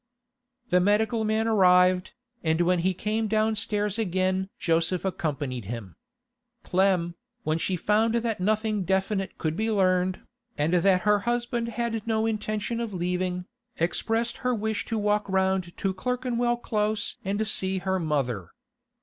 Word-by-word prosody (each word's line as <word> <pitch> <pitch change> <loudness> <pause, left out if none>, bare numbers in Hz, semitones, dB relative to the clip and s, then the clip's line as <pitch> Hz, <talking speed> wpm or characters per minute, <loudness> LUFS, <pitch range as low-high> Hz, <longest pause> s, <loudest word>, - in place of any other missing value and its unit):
The 180 - +5
medical 215 +4 +2
man 220 +1 +1
arrived, 180 -3 +4 0.3
and 160 +1 +2
when 180 +1 +3
he 185 +3 +2
came 215 +4 -1
downstairs 215 -1 0
again 190 -1 0
Joseph 165 +2 +1
accompanied 145 - -2
him. 115 -2 -6 0.7
Clem, 180 -2 +2 0.3
when 155 +1 0
she 185 - -1
found 215 +6 +2
that 230 -3 -1
nothing 215 +1 0
definite 190 +1 -1
could 155 -1 -2
be 220 +4 0
learned, 185 -3 +2 0.4
and 155 +3 +1
that 185 +1 +4
her 210 0 +3
husband 240 +1 -1
had 230 -1 -3
no 220 -1 +1
intention 215 +1 -2
of 225 -4 -3
leaving, 180 0 -1 0.3
expressed 225 +7 0
her 250 -1 0
wish 220 -1 -2
to 225 - -2
walk 210 -1 +1
round 190 -2 0
to 195 -1 -1
Clerkenwell 240 +2 -1
Close 215 -2 -1
and 205 +3 -1
see 190 -2 0
her 190 0 -1
mother. 130 - -1
195 Hz, 140 wpm, -26 LUFS, 180-220 Hz, 0.7 s, The